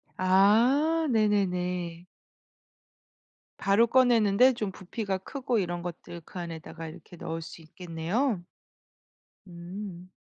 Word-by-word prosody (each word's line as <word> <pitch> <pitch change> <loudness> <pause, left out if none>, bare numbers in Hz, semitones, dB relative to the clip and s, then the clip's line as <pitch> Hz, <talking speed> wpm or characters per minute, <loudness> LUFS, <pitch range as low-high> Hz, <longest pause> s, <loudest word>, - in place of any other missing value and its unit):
아 235 - +4
네네네. 180 -5 0 1.5
바로 205 +4 +3
꺼내는데 245 -1 +5
좀 210 -4 -3
부피가 190 +1 -4
크고 250 +4 -3
이런 175 -2 -2
것들 170 0 -7
그 185 - -8
안에다가 165 -1 -7
이렇게 160 +2 -12
넣을 165 0 -5
수 165 +1 -10
있겠네요. 175 - -2 1.1
음. 180 +1 -8
190 Hz, 210 characters per minute, -28 LUFS, 175-225 Hz, 1.5 s, 꺼내는데